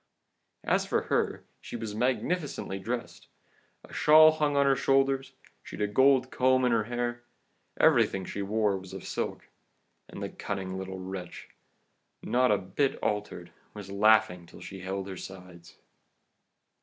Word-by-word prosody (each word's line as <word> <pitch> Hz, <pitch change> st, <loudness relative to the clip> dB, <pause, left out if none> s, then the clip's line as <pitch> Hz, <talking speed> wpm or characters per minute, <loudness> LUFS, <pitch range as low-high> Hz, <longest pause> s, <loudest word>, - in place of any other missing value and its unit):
As -, -, +1 dB
for -, -, 0 dB
her, -, -, 0 dB, 0.2 s
she -, -, -8 dB
was 110 Hz, -3 st, -5 dB
magnificently 130 Hz, -, -2 dB
dressed, 120 Hz, +4 st, -5 dB, 0.6 s
a -, -, -15 dB
shawl 155 Hz, +1 st, +7 dB
hung 150 Hz, -2 st, 0 dB
on 140 Hz, -, +4 dB
her 135 Hz, -1 st, +4 dB
shoulders, 135 Hz, 0 st, +1 dB, 0.3 s
she'd -, -, -10 dB
a 105 Hz, -, +2 dB
gold 130 Hz, +4 st, +3 dB
comb 130 Hz, 0 st, +3 dB
in 125 Hz, -, +2 dB
her 115 Hz, -2 st, +2 dB
hair, 120 Hz, 0 st, -3 dB, 0.6 s
everything 95 Hz, -1 st, +3 dB
she 100 Hz, -, -5 dB
wore 105 Hz, 0 st, +1 dB
was 95 Hz, 0 st, -12 dB
of 95 Hz, -, -7 dB
silk; -, -, -4 dB, 0.6 s
and -, -, -8 dB
the -, -, -3 dB
cunning 95 Hz, -2 st, -5 dB
little 95 Hz, 0 st, -5 dB
wretch, 95 Hz, -1 st, -8 dB, 0.7 s
not 125 Hz, +1 st, +2 dB
a 105 Hz, -, +4 dB
bit 100 Hz, +9 st, -1 dB
altered, 105 Hz, -4 st, -3 dB, 0.2 s
was 100 Hz, -2 st, -8 dB
laughing 100 Hz, -4 st, +3 dB
till -, -, -14 dB
she 95 Hz, -, -9 dB
held 95 Hz, +1 st, -4 dB
her 95 Hz, -2 st, -7 dB
sides. 90 Hz, -2 st, -11 dB
105 Hz, 150 wpm, -28 LUFS, 95-130 Hz, 0.7 s, shawl